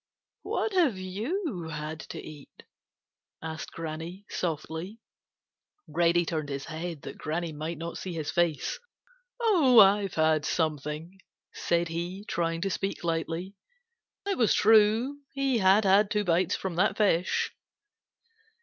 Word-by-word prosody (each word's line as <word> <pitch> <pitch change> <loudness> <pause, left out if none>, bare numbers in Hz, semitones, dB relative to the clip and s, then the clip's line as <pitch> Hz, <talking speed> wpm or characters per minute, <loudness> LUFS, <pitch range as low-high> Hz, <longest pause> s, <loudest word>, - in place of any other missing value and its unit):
"What 440 - -2
have 320 - +3
you 205 - -3
had 155 0 -5
to - - -6
eat?" 150 -3 -12 0.8
asked 160 -1 -6
Granny 165 +4 -6
softly. 165 +5 -4 0.9
Reddy 175 0 +2
turned 155 -3 -3
his 140 0 -4
head 165 -1 -6
that - - -8
Granny 165 +2 -2
might 155 +2 -4
not 165 +2 -5
see 185 - -5
his 155 -3 -3
face. 175 - 0 0.6
"Oh, 345 - +4
I've 200 -2 +6
had 155 -1 +3
something," 155 +4 -2 0.3
said 170 0 0
he, 175 +5 -4
trying 165 -1 -1
to 195 - 0
speak 195 +2 -3
lightly. 165 +3 -2 0.7
It 400 -2 -1
was 230 - +4
true; 225 +6 +4 0.2
he 270 -3 +1
had 195 +2 +5
had 200 +2 +5
two 210 0 +1
bites 175 -1 +2
from 185 -3 -4
that 200 +4 +2
fish. 185 -4 +2
175 Hz, 130 wpm, -28 LUFS, 160-210 Hz, 0.9 s, I've